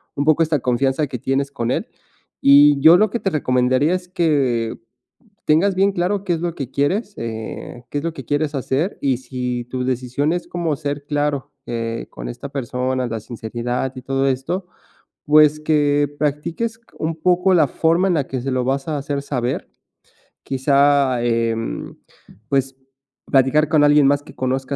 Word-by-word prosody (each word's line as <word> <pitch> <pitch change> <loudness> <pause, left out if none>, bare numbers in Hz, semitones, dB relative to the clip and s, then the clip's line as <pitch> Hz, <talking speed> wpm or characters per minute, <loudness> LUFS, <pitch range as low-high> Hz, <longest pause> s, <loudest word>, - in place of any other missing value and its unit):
un 140 - 0
poco 155 +1 +4
esta 160 -2 +2
confianza 130 +4 +1
que 125 -3 -6
tienes 135 +3 -1
con 120 -4 -3
él. - - -1 0.5
Y 145 +1 +7
yo 160 +5 +8
lo 215 +2 +3
que 235 - -3
te 195 - -1
recomendaría 130 0 +1
es 180 0 -3
que 140 -10 0 0.7
tengas 180 +6 +3
bien 195 +2 +3
claro 190 +2 -1
qué 180 - 0
es 165 - -3
lo 170 -1 -2
que 135 -4 -5
quieres, 195 +10 0
eh, 115 +1 -6
qué 145 - -2
es - - -8
lo 165 -1 -2
que - - -9
quieres 145 0 -1
hacer 140 +7 -1
y 135 -3 +1
si 125 -1 -4
tu 125 +1 -4
decisión 130 +4 -1
es 175 - -4
cómo 170 -3 -2
ser 145 0 -4
claro, 145 -2 -1
eh, 115 -1 -4
con - - -8
esta 140 - -7
persona, 130 -1 -2
la 115 -1 -4
sinceridad 120 +3 -4
y 130 - -7
todo 135 +1 0
esto, 135 +8 -2 0.6
pues, 150 0 +5
que 145 -2 +2
practiques 150 +10 -2
c - - -28 0.2
un 160 +1 -2
poco 180 +3 +2
la 160 -5 +4
forma 165 +7 +2
en 185 - +2
la 145 -4 0
que 130 - -3
se 135 - -3
lo 130 -1 0
vas 135 +2 -1
a 155 -2 -1
hacer 140 0 -3
saber. 125 -3 -3 0.8
Quizá, 140 -1 +2
em, 115 -1 -2 0.5
pues 135 -1 0 0.5
platicar 140 +3 +3
con 155 -1 +3
alguien 145 -1 +5
más 140 +1 +2
que - - -15
conozca 130 +1 -2
140 Hz, 180 wpm, -20 LUFS, 130-155 Hz, 0.8 s, yo